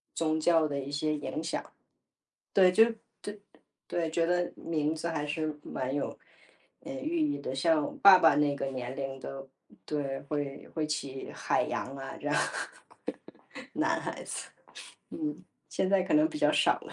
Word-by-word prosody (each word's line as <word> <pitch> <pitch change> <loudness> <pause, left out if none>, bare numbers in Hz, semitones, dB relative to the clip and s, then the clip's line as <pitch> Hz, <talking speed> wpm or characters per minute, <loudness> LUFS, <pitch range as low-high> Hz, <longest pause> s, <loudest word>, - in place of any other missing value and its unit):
宗 160 -1 +1
教 160 0 +4
的 140 -1 -2
一 135 0 -5
些 150 +1 0
影 150 +2 -4
响。 165 - -1 0.9
对， 185 -2 +7
就 220 +5 +7 0.4
对 205 0 -6 0.5
对， 165 -2 -1
觉 165 +1 +2
得 175 +1 +1
名 155 -1 -1
字 160 +1 -3
还 160 -3 -2
是 155 0 -2
蛮 130 0 -3
有， 145 0 -2 0.6
呃， 275 - -7
寓 300 +6 -2
意 295 -2 +1
的。 130 - -4
像， 155 +2 +3
我 - - -3
爸 195 -2 +11
爸 165 -3 +6
那 145 -1 +3
个 140 - -3
年 130 -1 -4
龄 135 -1 -4
的 135 0 -7 0.4
对， 140 -3 -2
会 145 -2 -3
会 155 -2 0
起 140 -3 -4
海 - - +1
洋 135 - -3
啊， 135 0 -6
这 - - -7
样。 - - +1 1.4
男 - - +2
孩 - - -5
子， - - -5 0.6
嗯， 305 -2 -4 0.3
现 190 - 0
在 195 0 +4
可 185 - -2
能 305 +1 +5
比 310 - -5
较 - - +4
少 - - +4
了， - - -11
155 Hz, 190 characters per minute, -30 LUFS, 140-180 Hz, 1.4 s, 爸